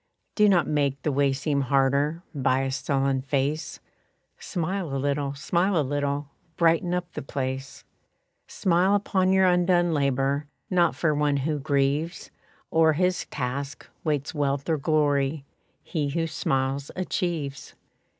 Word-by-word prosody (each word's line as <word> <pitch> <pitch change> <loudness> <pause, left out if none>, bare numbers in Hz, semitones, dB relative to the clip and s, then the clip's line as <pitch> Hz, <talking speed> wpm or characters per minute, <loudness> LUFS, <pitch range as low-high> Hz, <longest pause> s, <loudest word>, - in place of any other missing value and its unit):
Do 210 -1 +4
not 175 -4 +4
make 140 -2 0
the 150 - +1
way 140 0 +2
seem 140 +1 0
harder 140 +5 +1
By 135 -2 +1
a 135 0 -1
sullen 135 0 0
face, 140 +3 -2 0.6
Smile 175 -4 -3
a - - 0
little, 140 0 -1
smile 175 +6 +1
a - - +2
little, 145 +1 -1 0.3
Brighten 170 +1 +3
up 180 -1 -3
the - - -4
place. 135 0 -4 0.6
Smile 185 +2 +2
upon 190 -2 +1
your 190 0 +4
undone 175 -1 +3
labor; 140 0 0 0.2
Not 175 -2 +3
for 155 -3 +1
one 145 -1 +1
who 150 +2 -1
grieves 140 +5 -1 0.4
O'er 160 -1 +5
his 180 +3 0
task, 135 0 -4 0.2
waits 150 0 -1
wealth 140 -2 -1
or 160 -2 +1
glory; 145 -1 +1 0.4
He 150 -5 -2
who 165 +3 -1
smiles 135 -3 -1
achieves. 170 -6 -3
145 Hz, 140 wpm, -26 LUFS, 140-170 Hz, 0.6 s, O'er